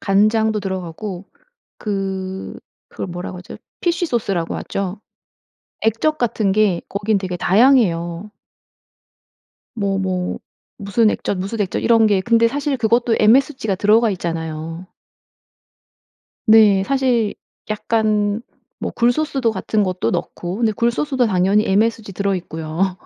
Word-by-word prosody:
간장도 215 +2 +2
들어가고 190 0 -5 0.5
그, 190 -2 -4 0.3
그걸 - - -6
뭐라고 180 +1 -6
하죠? 180 - -10 0.2
피쉬소스라고 240 - -1
하죠. 195 +1 -4 0.8
액젓 230 +8 +1
같은 220 -4 0
게 200 -4 +2
거기는 205 +1 0
되게 185 -2 -4
다양해요. 190 -4 +2 1.4
뭐, 200 -3 -1
뭐, 185 -1 -2 0.4
무슨 210 +2 +2
액젓 200 - -2
무슨 200 +4 -4
액젓 190 - -2
이런 225 -2 +5
게 195 -2 +2
근데 230 +1 +3
사실 280 +2 -2
그것도 235 0 +2
MSG가 250 -1 +3
들어가 215 +4 +3
있잖아요. 165 -1 -5 1.6
네. 215 -3 +6
사실 250 -4 +1 0.3
약간 215 -1 0 0.4
뭐 - - -3
굴소스도 245 0 +1
같은 210 +1 0
것도 185 -1 -1
넣고. 175 +1 -4
근데 225 -2 +2
굴소스도 245 +3 0
당연히 195 +2 +2
MSG 215 +1 +1
들어 200 +1 0
있고요. 170 +2 -3
205 Hz, 265 characters per minute, -19 LUFS, 185-230 Hz, 1.6 s, 네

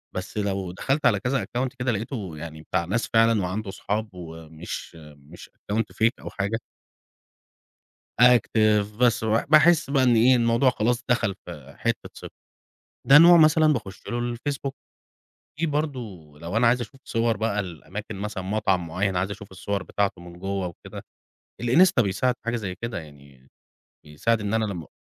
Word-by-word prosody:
بس 95 +3 -6
لو 100 -3 -2
دخلت 135 - -1
على 100 -4 +4
كذا 135 +6 -1
account 125 +2 -2
كده 125 0 0
لقيته 105 - -5
يعني 80 0 -8
بتاع 85 +1 -2
ناس 110 +7 -1
فعلًا 115 -1 +4
وعنده 95 +3 -3
صحاب 105 +3 -3
ومش 80 -2 -8 0.2
مش 75 +5 -14 0.2
account 110 +2 +2 0.2
fake - - +6
أو - - -7
حاجة. 100 +3 -2 1.6
active 110 -4 +4
بس 120 -2 +2
وباحس 150 +9 +4
بقى 140 -2 +2
إن 125 -2 +4
إيه، 125 +3 +5
الموضوع 120 +2 +3
خلاص 120 0 0
دخل 115 -5 +1
في 75 -5 -11
حِتّة - - -2
ثقة، - - -9 0.8
ده 140 +2 +9
نوع 170 +2 +8
مثلًا 155 -1 +5
باخش 105 -8 -5
له، 120 0 -2
الFacebook، 140 +3 -4 0.9
في 165 - +1
برضه 150 -3 -1 0.4
لو 85 +6 -3
أنا 115 +1 +4
عايز 125 +1 +2
أشوف 120 +3 -9
صور 115 -1 0
بقى 105 -1 -1
لأماكن 95 +4 -8
مثلًا، 100 -1 -5
مطعم 95 -3 0
معين 95 +4 -1
عايز 90 +3 -1
أشوف 100 0 -9
الصور 100 +1 -3
بتاعته 100 -2 -2
من 85 0 -12
جوّة 95 0 -2
وكده، 85 - -10 0.6
الInsta 140 +4 +4
بيساعد 115 +5 0
في - - -47
حاجة 120 +1 0
زي 100 -5 -4
كده 115 +3 -5
يعني 70 -4 -15 0.6
بيساعد 95 +10 -1
إن 105 +1 -2
أنا 110 0 +1
لما 90 -7 -5
105 Hz, 165 wpm, -24 LUFS, 95-120 Hz, 1.6 s, ده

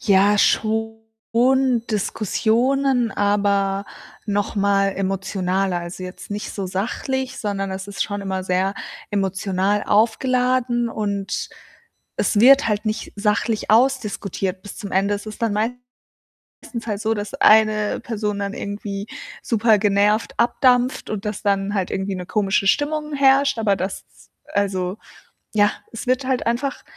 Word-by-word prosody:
Ja, 200 0 +4
schon 225 +1 +1 0.9
Diskussionen, 235 +5 +1
aber 200 -1 +1 0.4
noch 205 0 -1
mal 200 0 +3
emotionaler. 190 -1 -1
Also, 175 +2 -7
jetzt 185 +2 -9
nicht 205 0 -4
so 195 -2 -3
sachlich, 250 +8 -3
sondern 195 -2 -2
es 190 +1 -5
ist 200 - -2
schon 205 -1 -4
immer 190 -1 -3
sehr 190 +2 0 0.4
emotional 195 0 0
aufgeladen, 245 +2 +2
und 200 -3 -3 0.7
es 210 - +1
wird 265 +1 +7
halt 210 0 -1
nicht 215 0 -3
sachlich 210 +2 0
ausdiskutiert 210 -6 +1
bis 205 - -10
zum 200 -2 -7
Ende. 195 +2 +2
Es 205 - -6
ist 215 - -8
dann 225 -3 +1
meistens 245 +4 -4 0.9
halt 205 -2 -2
so, 225 0 0
dass 205 +3 -5
eine 215 -4 +4
Person 210 -3 -3
dann 200 0 -3
irgendwie 200 0 -5 0.4
supergenervt 210 -2 +2
abdampft 245 +1 +2
und 210 -1 -4
dass 210 -1 -4
dann 200 0 0
halt 190 -3 -1
irgendwie 195 0 -2
'ne 180 -1 -6
komische 195 0 +1
Stimmung 300 +6 0
herrscht, 275 -1 +4
aber 205 -3 +2
das 190 +1 -4 0.5
also, 190 -2 -1 0.6
ja, 205 -1 +4 0.2
es 230 - -7
wird 255 +2 +1
halt 260 -1 -1
einfach 245 +4 -1
205 Hz, 135 wpm, -21 LUFS, 195-230 Hz, 0.9 s, wird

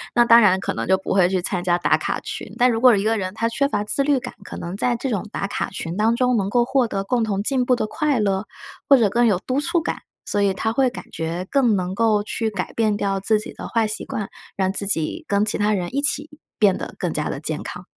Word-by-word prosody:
那 240 - +5
当 235 0 +7
然 190 -3 +4
可 - - -3
能 - - -4
就 190 0 +4
不 190 - -3
会 185 -2 +4
去 185 -1 0
参 180 0 -2
加 175 -1 +2
打 175 - +2
卡 - - -2
群。 - - -7
但 250 0 +4
如 225 - -1
果 250 -3 +7
一 195 - -1
个 225 +1 +1
人 185 -2 -3
他 230 +1 0
缺 280 +4 0
乏 210 -7 -1
自 275 +6 0
律 280 -2 +2
感， 250 - -7
可 - - -8
能 175 +2 -5
在 240 +4 0
这 260 +3 -3
种 210 -2 -2
打 195 - -3
卡 - - -3
群 165 +2 -5
当 220 +3 +2
中 250 0 +2
能 200 -2 0
够 240 +1 +2
获 255 -1 +2
得 195 -2 -3
共 235 +3 0
同 200 -2 -1
进 260 +2 +1
步 250 - +3
的 225 - -1
快 295 0 0
乐， 195 -1 0 0.4
或 275 - +8
者 220 -4 +3
更 240 +3 +3
有 200 -5 +3
督 260 +8 -1
促 340 +2 +1
感， - - -3 0.3
所 205 - -1
以 200 -1 +2
他 220 +3 -1
会 265 0 +3
感 240 - -9
觉 170 +3 -4
更 255 -6 +3
能 185 -1 -2
够 215 0 +2
去 220 +1 -2
改 195 -4 -5
变 215 -2 +1
掉 195 -1 -1
自 215 +2 +1
己 215 - -8
的 - - -8
坏 225 -2 +1
习 215 - -4
惯， 205 -2 -4 0.3
让 190 0 0
自 200 0 -1
己 195 - -1
跟 200 +1 +2
其 210 - -2
他 210 +1 +2
人 185 +5 -3
一 280 - +1
起 290 +1 +1 0.3
变 200 -3 +4
得 - - -7
更 - - -2
加 - - -2
地 - - -4
健 - - -4
康。 - - -8
215 Hz, 295 characters per minute, -22 LUFS, 195-245 Hz, 0.4 s, 或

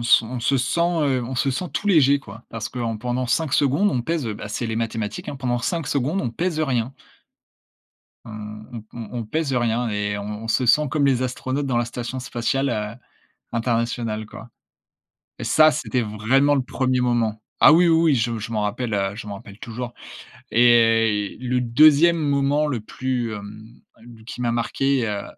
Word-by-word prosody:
s 120 0 +5
on 120 +2 -5
se 135 +3 +2
sent, 130 +7 0
heu, 150 -7 +1
on 130 +2 -5
se 135 +2 +1
sent 175 +8 -3
tout 195 - -3
léger, 145 -7 +5
quoi, 115 -3 -12
parce 115 -2 -5
que 125 - -8
en 115 -2 -2
pendant 125 +2 -2
5 145 +3 0
secondes, 145 +9 +3
on 120 - -1
pèse, 160 -3 -2
heu, 105 - -3
bah, 105 - -7
c'est 120 +2 -3
les 110 0 -3
mathématiques, 115 -2 -3
hein, 140 - -5
pendant 125 -2 -1
5 165 +6 -2
secondes, 145 +8 0
on 120 - -2
pèse, 165 +6 -2
heu, - - +2
rien 125 -2 -1 1.3
on 115 - -10 0.4
on 115 -3 -7
on 115 -3 -7
on - - -4
pèse 150 +3 -2
rien 120 -1 0
et 105 -1 -2
on 105 +2 -6
se 125 +2 +1
sent 150 +4 +4
comme 145 -1 +2
les 130 -2 +2
astronautes 130 +2 -2
dans 125 -3 0
la 120 - +2
station 120 +2 -5
spatiale, 130 +2 -1
heu, 105 0 -3 0.6
internationale, 115 -2 -1
quoi 115 +2 -12 0.9
et - - -4
ça, 155 0 +5
c'était 140 -4 -1
vraiment 115 +7 +2
le 140 - +2
1er 130 0 -1
moment. 115 -3 0 0.2
Ah - - +9
oui, 175 +1 +5
oui, 165 -2 +4
je 115 -1 0
je 115 +2 -6
m'en 110 - -1
rappelle, 110 +3 -2
heu, 100 0 -1
je 110 - -8
m'en 100 - -5
rappelle 100 0 -12
toujours 120 +1 -6 0.6
et 115 -3 +4
le 125 0 -1
2e 155 +7 +5
moment 145 0 +1
le 125 -7 -2
plus, 125 0 -3
hem, 105 +1 -9 0.6
qui 125 - -7
m'a 120 -1 +1
marqué, 125 +1 0
heu, 105 -1 -3
120 Hz, 195 wpm, -22 LUFS, 115-140 Hz, 1.3 s, Ah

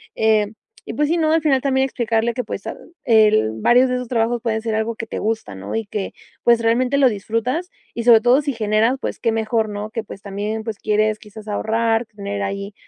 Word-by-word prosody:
eh, 215 -1 +2 0.3
y, - - -5
pues, 295 0 +1
sí, 340 - +2
¿no?, 315 -2 +2
al 325 - +3
final 270 -4 +3
también 265 -1 +2
explicarle 235 -2 0
que, 250 +1 -3
pues, 195 - -6
ah, - - -4 0.3
el 215 - +4
varios 250 +2 +5
de 250 - 0
esos 250 -1 -5
trabajos 230 0 0
pueden 220 -2 -1
ser 225 -2 -1
algo 220 +1 -1
que 225 - -6
te - - -4
gusta, 220 - -2
¿no?, 95 +1 -6
y 225 -1 -1
que, 200 -1 -4 0.3
pues, 235 -1 +4
realmente 250 +4 +2
lo 270 -2 +5
disfrutas, 230 - -2 0.2
y 235 - -3
sobre 230 -2 +7
todo 245 +4 +4
si 280 -1 -2
generas, 220 +2 +2
pues, - - -4
qué 230 - +1
mejor, 220 0 0
¿no?, 210 +1 -5
que, 225 0 -3
pues, 195 - -10
también, 210 +2 -4
pues, 215 -2 -5
quieres 215 0 +1
quizás 215 -1 -12
ahorrar, 225 +2 0
tener 200 -1 -5
ahí, 200 +1 -4
225 Hz, 225 wpm, -20 LUFS, 215-245 Hz, 0.3 s, sobre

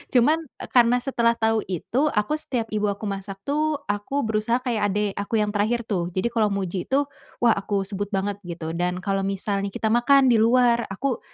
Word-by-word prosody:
Cuman, 295 +7 +5 0.2
eee, - - -8
karena 245 0 +5
setelah 235 -3 +2
tahu 220 -1 +2
itu, 240 - 0
aku 210 +8 +1
setiap 245 -6 -2
ibu 210 0 +1
aku 200 +2 -5
masak 195 -1 -5
tuh 305 +2 +1 0.2
aku 205 +8 -2
berusaha 220 +2 +1
kayak 230 -4 0
adik 205 +1 0
aku 200 +3 -2
yang 210 -1 +1
terakhir 220 +3 0
tuh. 180 -6 -1
Jadi, 190 +6 0
kalau 220 -2 +3
muji 190 -2 -3
itu, 275 +2 +2 0.4
wah, 235 - +6
aku 200 0 -1
sebut 200 0 -4
banget, 200 0 -2
gitu. 165 -2 -5
Dan 180 +1 -2
kalau 195 0 0
misalnya 195 +1 -2
kita 215 +2 -2
makan 260 +2 +5
di 230 - +4
luar, 235 0 +3
aku 250 +6 -2
215 Hz, 195 wpm, -24 LUFS, 195-240 Hz, 0.4 s, wah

